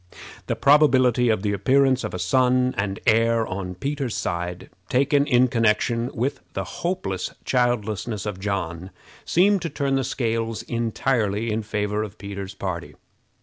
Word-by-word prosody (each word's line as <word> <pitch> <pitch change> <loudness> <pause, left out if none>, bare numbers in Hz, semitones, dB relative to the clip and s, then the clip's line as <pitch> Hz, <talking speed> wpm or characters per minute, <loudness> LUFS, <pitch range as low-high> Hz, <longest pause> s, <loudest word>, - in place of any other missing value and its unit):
The - - 0
probability 130 -4 +4
of 110 -3 +1
the 100 -1 0
appearance 130 +5 +3
of - - -4
a - - -2
son 125 +7 +2
and 100 0 -2
heir 115 0 +3
on 95 -2 -5
Peter's 135 +2 -3
side, 90 +1 -4 0.2
taken 140 +2 +2
in 125 +1 +4
connection 115 +1 +1
with 125 0 -1
the 95 - -2
hopeless 170 - -3
childlessness 110 -4 0
of 105 -3 -4
John, 95 -3 -3 0.4
seemed 195 +2 +3
to 165 - -3
turn 140 -2 -1
the 135 - 0
scales 115 -3 -2
entirely 115 -2 -1
in 110 +1 -1
favor 105 0 -2
of 110 -1 -6
Peter's 100 -1 -7
party. 90 -3 -5
115 Hz, 145 wpm, -23 LUFS, 100-130 Hz, 0.4 s, probability